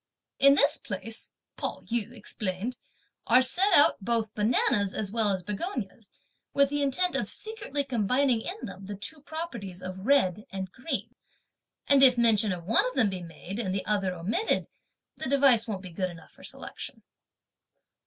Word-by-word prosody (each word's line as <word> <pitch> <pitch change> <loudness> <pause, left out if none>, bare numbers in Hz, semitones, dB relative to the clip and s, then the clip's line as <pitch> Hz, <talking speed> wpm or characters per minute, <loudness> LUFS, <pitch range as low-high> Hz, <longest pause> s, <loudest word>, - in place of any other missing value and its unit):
"In 275 0 +7
this 285 +2 +3
place," 225 +3 -6 0.3
Pao - - -3
yü 235 -1 -2
explained, 215 0 -4 0.5
"are 250 +2 +6
set 365 +11 +3
out 290 - +5
both 225 0 0
bananas 210 -2 +1
as 205 -3 -2
well 220 -2 +1
as 190 -2 -1
begonias, 210 - -5 0.5
with 280 0 +4
the 290 0 0
intent 320 +7 +1
of - - -1
secretly 415 -10 -3
combining 250 0 +1
in 390 - -6
them 190 +1 -9
the 205 - -5
two 290 +10 -8
properties 315 - -6
of 185 +3 -7
red 215 -8 +3
and 190 -1 -5
green; 260 - -4 0.7
and 280 -1 +5
if 255 -2 +8
mention 220 -3 +4
of 175 -2 -4
one 225 +5 +3
of 255 - -5
them 225 -7 +3
be 185 -1 -5
made, 175 +4 -8
and 190 -5 -1
the 195 - -2
other 200 -3 +1
be 180 - -4
omitted, 215 - 0 0.5
(the 270 - -3
device) 270 -5 +4
won't 200 -4 -4
be 185 - -8
good 185 +2 -2
enough 165 -2 -13
for - - -18
selection." - - -7
225 Hz, 175 wpm, -28 LUFS, 195-275 Hz, 0.7 s, if